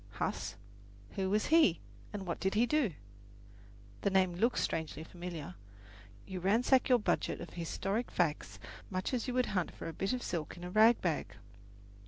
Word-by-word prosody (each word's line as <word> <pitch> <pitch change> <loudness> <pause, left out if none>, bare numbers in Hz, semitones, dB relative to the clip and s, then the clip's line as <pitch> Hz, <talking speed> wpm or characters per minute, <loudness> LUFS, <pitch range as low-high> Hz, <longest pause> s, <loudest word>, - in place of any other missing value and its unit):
Huss? - - -3 0.6
Who 190 -1 -1
was 210 +2 +2
he 305 - +6 0.3
and 200 -2 -5
what 170 - -3
did 190 +1 0
he 230 +3 +5
do? 245 - +1 1.1
The - - +2
name 190 -2 +3
looks 230 +8 +1
strangely 160 -1 -2
familiar. 170 - -7 0.7
You 185 -1 -5
ransack 235 +8 +3
your 250 - +7
budget 210 - 0
of - - -8
historic 195 +6 -2
facts 165 -4 -1 0.3
much 185 +5 -2
as 245 -1 -1
you 250 - -2
would 255 -1 +3
hunt 180 -3 +1
for - - -8
a 165 - -5
bit 195 +5 -1
of 250 - -2
silk 165 -1 -3
in 175 - -9
a 180 - -5
rag 220 +4 +6
bag. 150 - -1
190 Hz, 175 wpm, -33 LUFS, 175-230 Hz, 1.1 s, your